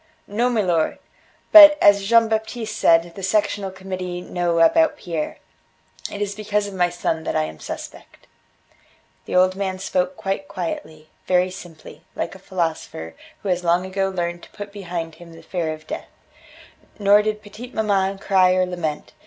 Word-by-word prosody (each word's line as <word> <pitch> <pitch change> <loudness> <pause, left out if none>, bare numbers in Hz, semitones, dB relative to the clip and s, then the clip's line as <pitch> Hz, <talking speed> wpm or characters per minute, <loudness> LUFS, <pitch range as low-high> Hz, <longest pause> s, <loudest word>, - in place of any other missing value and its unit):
"No, 235 +5 0
milor. 180 -9 +1 0.5
But, 300 -2 +11
as 200 -1 +5
Jean 230 +2 +5
Baptiste 220 0 -3
said, 165 -4 +3
the 195 - -9
Sectional 200 0 0
Committee 185 -1 -6
know 175 -1 -1
about 310 - +4
Pierre. 165 - -4 0.7
It 205 - -3
is 205 0 -3
because 210 0 -1
of 200 - -7
my 180 -2 +2
son 165 -2 -2
that - - -3
I - - +2
am 80 0 -7
suspect." - - -9 1.0
The - - -4
old 185 +1 +4
man 190 -1 -3
spoke 185 -1 -1
quite 195 0 -3
quietly, 160 -4 -6 0.2
very 180 0 +2
simply, 175 -3 -12
like - - -3
a 190 - -12
philosopher 165 - -4 0.3
who 200 - -3
has 180 -1 0
long 175 +1 +2
ago 195 +1 -1
learned 175 -2 -3
to - - -14
put 205 -1 -9
behind 175 -5 -5
him 170 -1 -12
the 165 0 -14
fear 165 -2 -2
of 155 0 -8
death. - - -6 0.9
Nor 205 0 +5
did 215 0 -3
petite 225 +5 -11
maman 195 -2 +1
cry 185 -2 +3
or 185 0 +2
lament. 175 -4 -4
185 Hz, 170 wpm, -22 LUFS, 175-205 Hz, 1.0 s, But